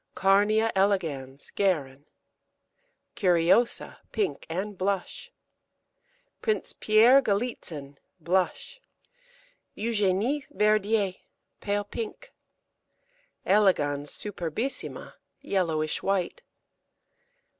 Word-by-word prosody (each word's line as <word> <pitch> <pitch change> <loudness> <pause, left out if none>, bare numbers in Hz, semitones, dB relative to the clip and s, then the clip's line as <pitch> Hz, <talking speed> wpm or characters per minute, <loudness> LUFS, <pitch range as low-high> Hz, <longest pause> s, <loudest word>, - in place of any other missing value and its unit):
Carnea 205 +3 +3
elegans 160 -9 -1
(Guerin). 145 -8 -1 1.1
Curiosa, 185 +2 +2
pink 410 -3 -2
and 195 +5 -3
blush. 190 0 -3 1.1
Prince 435 -1 0
Pierre 230 +6 +5
Galitzin, 195 - -3 0.2
blush. 185 - -1 0.9
Eugenie 220 +5 0
Verdier, 210 -5 +2 0.5
pale 205 0 -1
pink. 365 - -7 1.1
Elegans 150 -8 +2
superbissima, 205 - -5 0.3
yellowish 160 -5 -1
white. 195 - -1
200 Hz, 65 wpm, -27 LUFS, 170-220 Hz, 1.1 s, Pierre